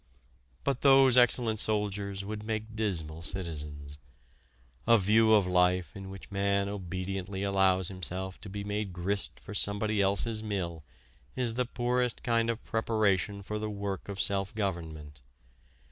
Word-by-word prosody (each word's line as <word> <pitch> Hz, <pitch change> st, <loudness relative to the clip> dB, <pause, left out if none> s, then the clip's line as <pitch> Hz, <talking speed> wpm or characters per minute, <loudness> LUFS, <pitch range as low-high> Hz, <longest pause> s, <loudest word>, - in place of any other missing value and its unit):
But 135 Hz, -2 st, -1 dB
those 135 Hz, -2 st, +6 dB
excellent 120 Hz, -3 st, +4 dB
soldiers 100 Hz, -2 st, -1 dB
would 105 Hz, +1 st, -5 dB
make 110 Hz, 0 st, -4 dB
dismal 85 Hz, -7 st, -1 dB
citizens. 75 Hz, -5 st, -5 dB, 0.9 s
A 115 Hz, 0 st, +7 dB
view 110 Hz, +3 st, +4 dB
of 105 Hz, -3 st, +4 dB
life 90 Hz, -2 st, +2 dB
in 95 Hz, -1 st, -8 dB
which 95 Hz, +1 st, -10 dB
man 100 Hz, 0 st, +1 dB
obediently 95 Hz, 0 st, -4 dB
allows 95 Hz, -2 st, +2 dB
himself 95 Hz, 0 st, -5 dB
to 105 Hz, -, -9 dB
be 100 Hz, +1 st, -5 dB
made 105 Hz, -1 st, -3 dB
grist 95 Hz, +3 st, -3 dB
for -, -, -9 dB
somebody 100 Hz, +1 st, +1 dB
else's 100 Hz, +3 st, +1 dB
mill 90 Hz, -7 st, -3 dB, 0.5 s
is 125 Hz, -3 st, +1 dB
the 125 Hz, +2 st, 0 dB
poorest 125 Hz, 0 st, -1 dB
kind 115 Hz, -1 st, +2 dB
of 115 Hz, 0 st, -2 dB
preparation 105 Hz, -3 st, 0 dB
for 105 Hz, +2 st, -4 dB
the 110 Hz, 0 st, -3 dB
work 100 Hz, -2 st, -4 dB
of 100 Hz, -1 st, -5 dB
self 100 Hz, +1 st, 0 dB
government. 80 Hz, -, -4 dB
100 Hz, 145 wpm, -30 LUFS, 95-110 Hz, 0.9 s, A